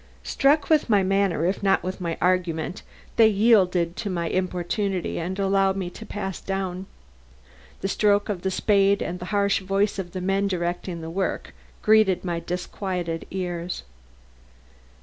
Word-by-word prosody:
Struck 280 Hz, +1 st, +2 dB
with 310 Hz, -5 st, +3 dB
my 205 Hz, -3 st, +4 dB
manner 195 Hz, -4 st, +1 dB
if 185 Hz, +3 st, 0 dB
not 195 Hz, -1 st, +2 dB
with 185 Hz, 0 st, -4 dB
my 170 Hz, -2 st, -2 dB
argument, 180 Hz, -1 st, 0 dB, 0.4 s
they 225 Hz, -, +7 dB
yielded 195 Hz, -5 st, +3 dB
to 205 Hz, -, -3 dB
my 170 Hz, -3 st, -2 dB
importunity 185 Hz, +1 st, -1 dB
and 180 Hz, +3 st, -3 dB
allowed 195 Hz, -1 st, +2 dB
me 180 Hz, -2 st, -3 dB
to 220 Hz, +4 st, -10 dB
pass 195 Hz, -3 st, -5 dB
down. 190 Hz, -1 st, -3 dB, 0.9 s
The 195 Hz, -, -1 dB
stroke 205 Hz, +1 st, +2 dB
of 195 Hz, -4 st, -3 dB
the 190 Hz, -, 0 dB
spade 200 Hz, +1 st, +2 dB
and 180 Hz, +1 st, -4 dB
the 180 Hz, -, -6 dB
harsh 200 Hz, 0 st, +1 dB
voice 195 Hz, +1 st, 0 dB
of 175 Hz, -2 st, -5 dB
the 185 Hz, -, -3 dB
man 195 Hz, +2 st, +1 dB
directing 175 Hz, -1 st, -3 dB
the 160 Hz, 0 st, -6 dB
work 190 Hz, +2 st, -2 dB, 0.3 s
greeted 215 Hz, -4 st, +4 dB
my 170 Hz, -2 st, -1 dB
disquieted 180 Hz, -1 st, -4 dB
ears. 180 Hz, -2 st, -4 dB
190 Hz, 155 wpm, -24 LUFS, 175-200 Hz, 0.9 s, they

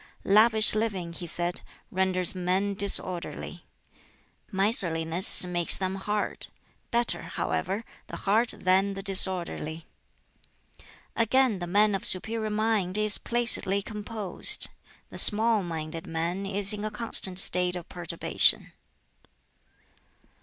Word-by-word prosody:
"Lavish 215 Hz, +2 st, +4 dB
living," 200 Hz, -6 st, -4 dB
he 175 Hz, +1 st, -8 dB
said, 175 Hz, +1 st, -3 dB, 0.3 s
"renders 185 Hz, -1 st, -1 dB
men 185 Hz, +2 st, -2 dB
disorderly; 190 Hz, -3 st, -1 dB, 0.9 s
miserliness 180 Hz, -4 st, +2 dB
makes 175 Hz, -1 st, +1 dB
them 190 Hz, -1 st, -4 dB
hard. 205 Hz, +2 st, -4 dB, 0.4 s
Better, 235 Hz, 0 st, -2 dB
however, 200 Hz, +4 st, -5 dB, 0.2 s
the -, -, -9 dB
hard 220 Hz, +4 st, 0 dB
than 190 Hz, +2 st, 0 dB
the 195 Hz, -, -8 dB
disorderly." 180 Hz, -4 st, 0 dB, 1.3 s
Again, 230 Hz, -2 st, 0 dB
"The 175 Hz, -, -6 dB
man 205 Hz, +3 st, +1 dB
of 195 Hz, -, -4 dB
superior 220 Hz, +4 st, 0 dB
mind 210 Hz, -3 st, -2 dB
is 215 Hz, -1 st, +2 dB
placidly 230 Hz, -5 st, +2 dB
composed; 210 Hz, -2 st, -2 dB, 0.4 s
the -, -, -1 dB
small 220 Hz, 0 st, +7 dB
minded 165 Hz, -2 st, -7 dB
man 170 Hz, +4 st, -4 dB
is 200 Hz, +1 st, +3 dB
in 210 Hz, 0 st, -7 dB
a 215 Hz, -, -3 dB
constant 210 Hz, -5 st, -2 dB
state 180 Hz, -1 st, +1 dB
of 175 Hz, -1 st, -9 dB
perturbation." 175 Hz, -1 st, +1 dB
195 Hz, 110 wpm, -25 LUFS, 180-215 Hz, 1.3 s, small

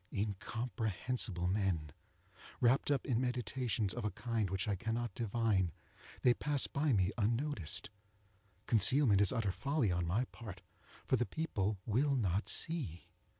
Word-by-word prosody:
Incomprehensible 110 Hz, -1 st, -2 dB
men! 90 Hz, -6 st, 0 dB, 0.7 s
Wrapped 125 Hz, +4 st, +3 dB
up 140 Hz, -2 st, +1 dB
in 125 Hz, -3 st, +1 dB
meditations 125 Hz, -4 st, -1 dB
of 120 Hz, -, -4 dB
a 105 Hz, -, +1 dB
kind 115 Hz, -3 st, -2 dB
which 95 Hz, +3 st, -1 dB
I 105 Hz, -, +1 dB
cannot 115 Hz, +2 st, -2 dB
divine, 110 Hz, -5 st, +1 dB, 0.5 s
they 125 Hz, -, +6 dB
pass 145 Hz, +1 st, +1 dB
me 120 Hz, -11 st, +2 dB
by 110 Hz, -, +1 dB
unnoticed. 115 Hz, -, -1 dB, 0.7 s
Concealment 115 Hz, -1 st, +4 dB
is 100 Hz, -, +5 dB
utter 115 Hz, -6 st, 0 dB
folly 140 Hz, -1 st, 0 dB
on 85 Hz, -1 st, 0 dB
my 105 Hz, +9 st, +1 dB
part, 100 Hz, -6 st, -10 dB, 0.4 s
for 130 Hz, -, +3 dB
the 120 Hz, -, 0 dB
people 105 Hz, -11 st, -1 dB
will 135 Hz, +6 st, +2 dB
not 100 Hz, -4 st, 0 dB
see. 130 Hz, -, -3 dB
110 Hz, 140 wpm, -35 LUFS, 95-125 Hz, 0.7 s, they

